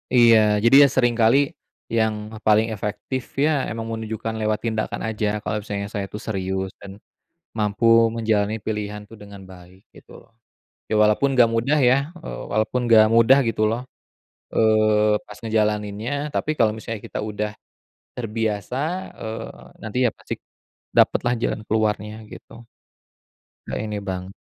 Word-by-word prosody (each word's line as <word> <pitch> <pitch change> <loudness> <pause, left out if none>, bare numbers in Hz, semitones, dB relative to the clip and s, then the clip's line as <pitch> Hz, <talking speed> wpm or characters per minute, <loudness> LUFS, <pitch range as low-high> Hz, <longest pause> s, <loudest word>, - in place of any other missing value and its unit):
Iya 120 -2 +7 0.3
jadi 120 - +6
ya 140 - +7
sering 120 -2 +3
kali, 115 +4 +5 0.6
yang 110 -1 +2 0.3
paling 110 +1 +4
efektif 105 +5 -4 0.2
ya - - +3 0.2
emang 115 0 -5
menunjukkan 110 0 -4
lewat 110 0 0
tindakan 110 -1 -2
aja 110 -1 -1
kalau 105 - -2
misalnya 100 -1 -4
saya 100 -2 -2
itu 105 - -7
serius 95 -2 -2
dan 100 - -9 0.7
mampu 105 +1 -1 0.3
menjalani 110 -2 0
pilihan 105 -1 -3
tuh 115 - -12
dengan 100 -1 -11
baik 95 +1 -15
gitu. - - -17 0.8
Ya 110 - +1
walaupun 105 +6 +3
nggak 120 -2 +6
mudah 135 +7 +2
ya, 125 - +5 0.2
eee, 165 - -7
walaupun 110 +4 0
gak 110 -1 +7
mudah 115 +4 +6
gitu 110 -1 -1
loh, 115 +2 -2 0.8
eee, 110 -1 +3
pas 105 - -11
ngejalaninnya 105 +1 -1 0.2
tapi - - -1
kalau 110 -2 +3
misalnya 110 0 -6
kita - - -5
udah, 105 0 -3 0.7
terbiasa, 110 -1 -3 0.4
eee, 110 0 -8
nanti 110 +3 -4
ya - - -2
pasti, - - -6 0.6
dapetlah 120 - +3
jalan 110 -2 -2
keluarnya 110 0 -1
gitu. 115 0 -13 1.0
Nggak - - -4
ini 105 -1 -4
bang 95 -1 -5
110 Hz, 140 wpm, -22 LUFS, 105-115 Hz, 1.0 s, Iya